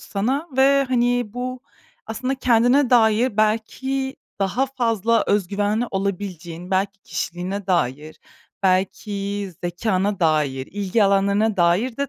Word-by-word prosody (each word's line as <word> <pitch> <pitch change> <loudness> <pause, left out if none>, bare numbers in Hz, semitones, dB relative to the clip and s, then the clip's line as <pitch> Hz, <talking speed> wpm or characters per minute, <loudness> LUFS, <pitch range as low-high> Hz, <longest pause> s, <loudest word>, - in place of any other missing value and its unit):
sana 260 +11 -2
ve, 275 +1 +4
hani, 245 -1 +2
bu 250 +1 -4 0.5
aslında 255 +4 -2
kendine 250 +1 +3
dair 225 -1 +3
belki 265 +5 -1 0.2
daha 200 +7 0
fazla 230 -4 +1
öz 200 -3 +1
güvenli 205 +4 0
olabileceğin, 180 -3 -4
belki 195 +1 -1
kişiliğine 185 +3 -4
dair, 155 -4 -1 0.4
belki 195 +1 -1
zekâna 190 +2 -1
dair, 150 -5 +1
ilgi 205 +2 0
alanlarına 200 +2 +2
dair 185 +8 +2
de 280 0 -2
205 Hz, 115 wpm, -22 LUFS, 190-245 Hz, 0.5 s, ve